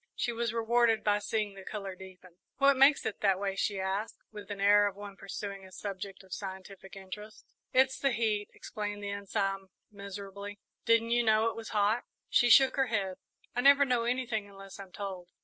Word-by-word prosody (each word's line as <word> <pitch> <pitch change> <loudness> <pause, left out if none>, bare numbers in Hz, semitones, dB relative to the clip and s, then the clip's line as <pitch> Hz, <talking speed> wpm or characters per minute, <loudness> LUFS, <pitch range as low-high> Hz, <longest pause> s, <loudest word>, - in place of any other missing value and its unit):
She 240 - -1
was 235 -1 -1
rewarded 230 0 +2
by 205 0 +2
seeing 210 0 -2
the 195 -1 -11
colour 195 -1 -5
deepen. 185 -1 -14 0.2
"What 280 0 +5
makes 275 +2 +5
it 215 - -3
that 195 -2 +3
way?" 195 0 -2
she 195 0 -1
asked, 190 +3 -2
with 210 -2 -9
the 205 - -4
air 205 +1 +5
of 200 - -4
one 205 -1 -9
pursuing 200 0 -6
a 190 - -13
subject 195 0 -6
of 190 -1 -10
scientific 190 -1 -8
interest. 210 +3 -10 0.3
"It's 260 +1 +3
the 275 - +2
heat," 215 -3 0
explained 205 -2 -6
the 200 - -3
Ensign, 195 -1 -2 0.2
miserably; 200 0 -8 0.3
"didn't 230 0 +3
you 240 0 +4
know 220 0 +3
it - - -11
was 225 -1 -7
hot?" 210 +3 +1 0.2
She 240 - +4
shook 265 +4 +6
her 270 -1 +3
head. 195 -5 -1 0.4
"I 245 - +1
never 280 +1 +7
know 245 -3 +1
anything 235 -4 -1
unless 195 0 -12
I'm 195 -2 -10
told." 185 -2 -6
205 Hz, 195 wpm, -31 LUFS, 195-230 Hz, 0.4 s, never